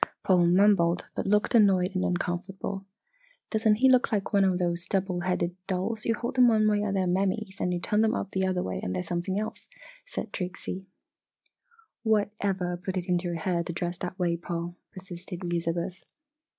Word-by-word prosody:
Paul 180 -2 +4
mumbled 180 -2 +4
but - - -2
looked 210 +4 +2
annoyed 195 -5 +5
and 185 - +1
uncomfortable. 190 +2 -3 0.6
"Doesn't 220 -1 +3
he 260 +5 +4
look 255 -1 +4
like 210 0 -1
one 200 -1 +5
of 190 -2 +3
those 175 0 0
double 190 -2 0
headed 175 -1 -1
dolls? 195 +4 -2
You 230 - +2
hold 240 +3 -4
them 250 -1 +7
one 215 -2 +4
way 210 -1 +2
and 200 -2 -1
they - - +2
are - - +1
Mammys, 190 +2 -1
and 180 - +1
you 175 - -1
turn 210 +4 +1
them 225 +2 +2
up - - -3
the 190 0 +1
other 185 -1 0
way 95 - -3
and 90 - -3
they 90 - -1
are - - -6
something 175 - -2
else," 215 - -5 0.4
said 230 - -5
Trixie. 185 +1 -5 1.1
"What 215 -2 +2
ever 185 -3 -1
put 185 +1 -4
it 180 0 -3
into 175 0 +1
your 170 -1 -2
head 170 0 -1
to 170 - -3
dress 175 +1 -3
that 180 0 -5
way, 175 -3 +1
Paul?" 170 0 -4 0.2
persisted 180 -1 -8
Elizabeth. 175 +1 -2
185 Hz, 200 wpm, -28 LUFS, 175-205 Hz, 1.1 s, them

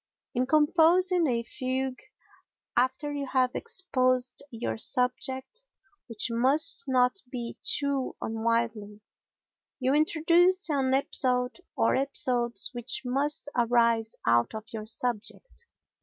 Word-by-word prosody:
In 250 +1 0
composing 335 +4 +4
a 235 -3 0
fugue, 260 +1 -3 0.7
after 260 +4 0
you 285 -1 -4
have 255 -1 +1
exposed 255 - 0
your 230 -2 -4
subject, 260 - -2 0.4
which 230 0 0
must 270 +8 +3
not 255 +5 +2
be 240 -3 -6
too 280 -2 -1
unwieldly, 220 -2 -2 0.8
you 260 0 +1
introduce 335 +5 +3
an 265 -2 +2
episode 250 0 0 0.2
or - - +2
episodes 255 -3 0
which 250 +2 -2
must 285 +5 -1
arise 235 -2 +2
out 120 - +2
of 220 - -5
your 215 -1 -6
subject. 245 - -5
255 Hz, 110 wpm, -28 LUFS, 235-290 Hz, 0.8 s, composing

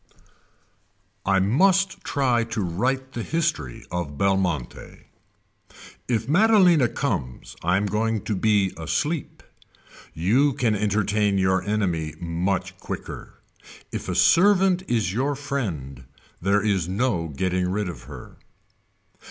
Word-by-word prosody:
I 95 0 +4
MUST 185 - +2
TRY 125 -5 +1
TO 115 -2 -3
WRITE 130 +10 -1
THE 120 - -4
HISTORY 155 - -2
OF 85 -5 -4
BELMONTE 95 -8 -2 1.0
If 115 -2 -1
Maddalena 180 - +5
comes 90 - -4
I 90 +2 +2
am 100 - 0
going 110 +1 0
to 105 - -2
be 100 -1 +2
asleep. 150 - -2 0.7
You 125 - +2
can 120 -3 +1
entertain 105 0 +1
your 95 -1 +2
enemy 90 -7 -1
much 90 +2 -2
quicker. - - -8 0.5
If - - -5
a - - -2
servant 185 0 +4
is 110 -6 0
your 135 +6 0
friend 85 - -4 0.4
there 100 +3 +2
is 95 -5 0
no 95 -4 0
getting 90 +4 -1
rid 105 +1 -1
of 80 -9 -8
her. - - -11
105 Hz, 120 wpm, -24 LUFS, 90-130 Hz, 1.0 s, Maddalena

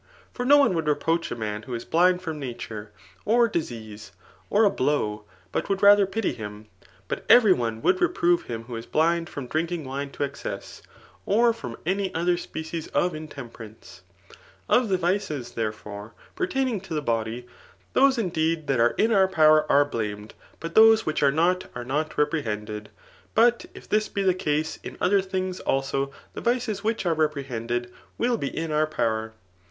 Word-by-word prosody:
For 245 - -3
naone 285 -6 +6
would 165 -3 -2
reproach 165 +3 0
a 120 - -5
«an 105 0 -3
who 120 +2 -6
is 115 - -6
blind* 180 +2 +3
from 160 -4 -5
aatun^ 115 -4 -6 0.4
OT 235 0 +3
disease, 110 - -5 0.4
or 210 +2 +4
a 205 - +6
blow, 110 - -1 0.3
but - - -2
would 195 - +1
ta^r 200 +1 +8
• 195 -1 +1
pity 225 -2 -1
him; 105 -1 -8 0.4
hM - - -3
etery 220 -6 +8
cme 115 -6 -3
woald 185 - +4
Fq>rove 175 0 +2
him 115 -1 -5
.who 120 0 -8
is 115 - -8
bliad 165 +2 +1
from 140 -3 -6
drmUng 165 +2 -2
Mie 140 +2 -4
to - - -3
excess, 140 -1 -6 0.5
or 230 +3 +4
from 125 - -8
any 190 +2 0
other, 175 +2 +2
species 160 -1 -6
of 180 -1 0
HMen^e^ 145 -6 -8
rance^ 110 -4 -13 0.7
Of 245 -3 +3
the 190 - +2
vices, 170 -8 -1
therefore, 105 -1 -5 0.2
pertaining 265 - -1
to 175 -4 -6
the 150 - -2
\»dfi 115 0 -2 0.5
Aoeekideed 170 - +2
that 135 -4 0
are 120 +1 +3
in 225 +2 +3
our 195 -3 +5
power 155 -4 +4
are 145 +1 +5
blamed, 105 -5 -5 0.3
but 165 0 -6
those 220 0 +7
which 155 - -1
are 140 -1 +5
not, 175 +5 +1
are 120 0 -5
not 150 +5 -1
repr^^en^* 105 -8 -2 0.5
But 235 +1 +4
if - - -12
this 215 0 +1
be 200 - -2
the 185 -1 +4
ettse^ 155 -3 -1
in - - -8
other 195 +2 +3
things, 185 -1 -3
also» 135 0 -1 0.2
the - - -6
vkes 240 -3 0
which 220 -2 -2
are 170 -2 +2
repr^ 150 -3 0
kended, 120 -1 -3 0.3
will 240 0 +1
be 140 - -3
in 160 +3 -4
our 155 +1 +2
power. 110 -6 -1
155 Hz, 180 wpm, -25 LUFS, 120-190 Hz, 0.7 s, ta^r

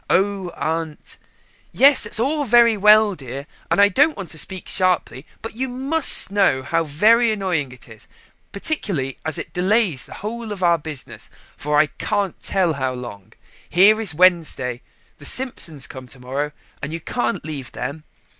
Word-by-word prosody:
"Oh, 195 -1 +1
aunt 160 -1 -4 0.3
" - - -35 0.2
"Yes, 280 +1 +5
that's 210 - -2
all 290 +5 0
very 235 -2 +5
well, 210 +1 +5
dear, 140 -3 -8 0.2
and - - +1
I 200 - +7
don't 290 - +2
want 195 -4 -7
to 160 - -2
speak 190 +2 -4
sharply, 180 -7 0 0.2
but 225 - -7
you 260 +2 -3
must 270 -2 +4
know 195 -10 +2
how 165 +4 0
very 220 +10 +3
annoying 180 -10 -2
it 125 0 -11
is: 110 -2 -14 0.4
particularly 195 - -2
as 155 -1 -3
it - - -7
delays 185 - +1
the - - -10
whole 225 +2 -6
of 195 -3 -5
our 170 -1 +3
business 150 -3 -8 0.3
for 150 0 -1
I 155 - +5
can't 200 +5 -3
tell 185 -4 0
how 130 -2 -2
long: 120 -6 -10 0.4
here 210 +5 +5
is 200 -7 -2
Wednesday 160 -8 +2 0.4
the 145 - -12
Simpsons 170 - -2
come 130 -3 -10
to 125 - -7
morrow, 135 +4 -3 0.3
and 140 +2 -5
you 165 - -4
can't 120 -4 -3
leave 140 -5 -6
them. 140 +5 -6
180 Hz, 175 wpm, -21 LUFS, 145-215 Hz, 0.4 s, I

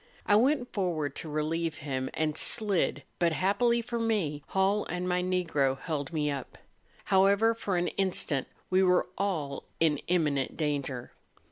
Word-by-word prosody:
I 205 - +4
went 250 +3 +2
forward 165 - -1
to 160 - -6
relieve 155 +2 -1
him, 130 -2 -3
and 155 -1 0
slid; 205 +1 +3 0.2
but 170 -2 +2
happily 235 +7 +2
for 235 0 -3
me, 200 -11 0
Hall 195 +2 +1
and 180 0 -3
my 180 0 +1
Negro 165 -7 0
held 150 -4 -3
me 150 -3 0
up. 140 -2 -6 0.5
However, 200 +4 +4
for 200 -5 -2
an 175 0 0
instant 180 -8 -1 0.2
we 185 +1 +4
were 180 -1 +4
all 160 -8 -2
in 155 -3 +2
imminent 150 -6 0
danger. 140 -5 -2
175 Hz, 150 wpm, -29 LUFS, 150-195 Hz, 0.5 s, I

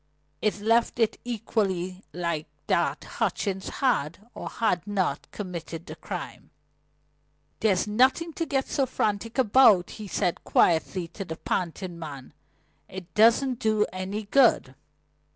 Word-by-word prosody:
It 215 -1 0
left 230 +3 +2
it 225 -2 +1
equally 195 -6 -2
likely 170 -3 -3 0.2
that - - +1
Hutchings 190 -2 -2
had, 210 - -1
or - - -6
had 205 -5 0
not, 190 -8 -1
committed 170 -4 -6
the - - -8
crime. - - -7 1.1
"There's 195 -4 +2
nothing 260 +10 +2
to 330 +1 -3
get 270 -2 0
so 270 -2 0
frantic 215 -1 -2
about," 220 -6 +5
he 210 - -6
said 175 -2 -1
quietly 170 +1 +2
to 195 +4 -6
the 160 -3 -7
panting 175 0 -3
man. 140 -5 -8 0.6
"It 185 -1 -9
doesn't 235 +3 +4
do 215 -1 +2
any 190 +3 -4
good." 215 - +3
205 Hz, 130 wpm, -26 LUFS, 175-230 Hz, 1.1 s, about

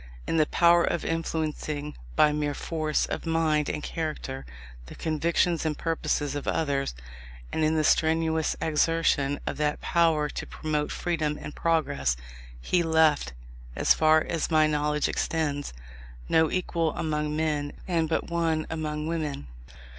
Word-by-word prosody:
In 165 - 0
the 155 -1 +4
power 170 0 +5
of 170 - -1
influencing 155 -2 -3 0.2
by 150 - +5
mere 150 -1 -1
force 155 -2 -1
of - - -5
mind 160 -2 +1
and 150 - -3
character, 150 -5 -4 0.4
the - - -10
convictions 165 +2 +1
and 155 -2 -1
purposes 155 -3 -1
of 145 -1 -5
others, 140 - 0 0.6
and 160 - 0
in 155 +1 +2
the 155 - +2
strenuous 160 0 +2
exertion 150 -3 +1
of - - -3
that 150 0 0
power 165 -3 +2
to - - -6
promote 150 -1 -2
freedom 155 -4 -1
and 150 - -7
progress, 110 - +1 0.4
he 175 - +1
left, 160 - +3 0.4
as - - +4
far 155 0 +4
as 165 -3 -1
my 155 -2 +4
knowledge 150 0 +1
extends, 145 -3 -1 0.6
no 160 -1 +3
equal 170 -3 -1
among 150 -1 -1
men 150 -2 -1 0.2
and 165 -3 +1
but 160 - +1
one 165 -2 0
among 155 -1 -3
women. 155 - -3
155 Hz, 145 wpm, -27 LUFS, 150-165 Hz, 0.6 s, power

